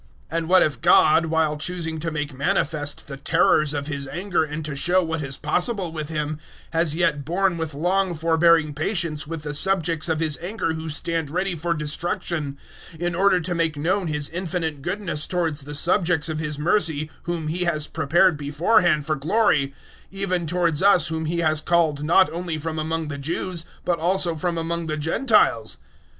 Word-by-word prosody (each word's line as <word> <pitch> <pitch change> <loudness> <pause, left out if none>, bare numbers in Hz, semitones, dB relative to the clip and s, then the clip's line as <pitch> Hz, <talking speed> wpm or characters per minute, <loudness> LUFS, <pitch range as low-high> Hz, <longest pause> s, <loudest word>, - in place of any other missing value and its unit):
009:022 165 - -1
And 165 0 -5
what 185 0 +6
if 140 -5 -2
God, 165 +2 +5
while 160 -1 +1
choosing 160 0 -2
to 165 +2 -2
make 150 -2 -4
manifest 145 -1 -1
the 135 -1 -7
terrors 150 +2 +3
of 145 -1 -2
His 140 -2 -4
anger 175 +2 -1
and 150 0 -5
to 150 -2 -4
show 175 +6 +2
what 160 -1 -3
is 135 -2 -3
possible 180 +4 0
with 155 -2 -5
Him, 150 -1 -3 0.3
has 165 -2 +1
yet 165 -4 +1
borne 180 +4 0
with 160 -3 -4
long 180 +3 +1
forbearing 165 -1 +3
patience 155 -1 -1
with 165 -1 -6
the 150 -1 -4
subjects 165 -1 0
of 160 -1 0
His 155 -3 0
anger 175 -2 -2
who 160 0 -5
stand 160 0 -2
ready 185 +4 -1
for 170 +1 -2
destruction, 150 -1 -3 0.4
009:023 160 - -14
in 175 0 -1
order 185 +1 +3
to 175 +2 -2
make 165 -3 0
known 180 +5 0
His 150 -2 -1
infinite 165 -4 -3
goodness 175 -2 -3
towards 165 -5 -1
the 145 +2 -7
subjects 165 0 +2
of 155 -1 -3
His 150 -2 -3
mercy 155 -2 +1
whom 170 -3 -3
He 175 +3 -1
has 155 -3 +1
prepared 160 +2 +2
beforehand 150 +2 +2
for 155 -1 0
glory, 155 -1 +2 0.4
009:024 195 - -12
even 185 -4 -1
towards 170 -2 +1
us 195 -3 +5
whom 160 0 -3
He 170 +2 -1
has 155 -1 +2
called 160 -4 +1
not 175 +5 +5
only 170 -1 -3
from 160 +1 -4
among 160 0 -2
the 140 -1 -5
Jews 170 +3 -3 0.2
but 175 -1 0
also 175 0 +2
from 170 +2 -2
among 165 0 -2
the 155 0 -2
Gentiles? 160 - +2
160 Hz, 190 wpm, -23 LUFS, 150-175 Hz, 0.4 s, what